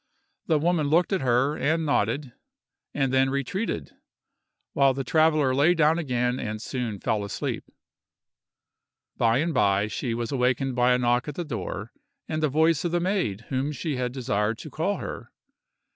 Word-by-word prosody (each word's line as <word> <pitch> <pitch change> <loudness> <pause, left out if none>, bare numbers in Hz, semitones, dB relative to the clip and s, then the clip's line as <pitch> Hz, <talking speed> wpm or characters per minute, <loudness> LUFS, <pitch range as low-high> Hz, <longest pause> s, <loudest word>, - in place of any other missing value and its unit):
The 160 - +3
woman 160 -1 +1
looked 170 +6 +2
at 190 - +1
her, 130 +3 +2
and 160 +2 0
nodded, 130 0 0 0.6
and 135 -2 0
then 130 0 +3
retreated, 140 - -3 0.8
while 135 -2 +3
the 135 - -2
traveller 155 -2 +3
lay 150 +7 +4
down 160 +1 +3
again 125 -4 -1
and 110 -2 -4
soon 115 -3 -4
fell 105 +1 -1
asleep. 100 - -4 1.5
By 115 0 +3
and 160 +4 0
by, 100 -5 +3
she 115 +2 -3
was 120 +1 -3
awakened 130 0 0
by 125 0 +4
a - - +3
knock 120 +1 +1
at 150 - -5
the 175 - -3
door 110 - -5 0.4
and 155 0 -2
the 155 - +2
voice 160 +1 +2
of 175 - -1
the 175 - +1
maid 175 - -1
whom 135 +2 -1
she 150 +1 -3
had 125 -1 -1
desired 110 -4 -1
to 155 - -9
call 165 +8 -1
her. - - -7
135 Hz, 170 wpm, -26 LUFS, 120-155 Hz, 1.5 s, lay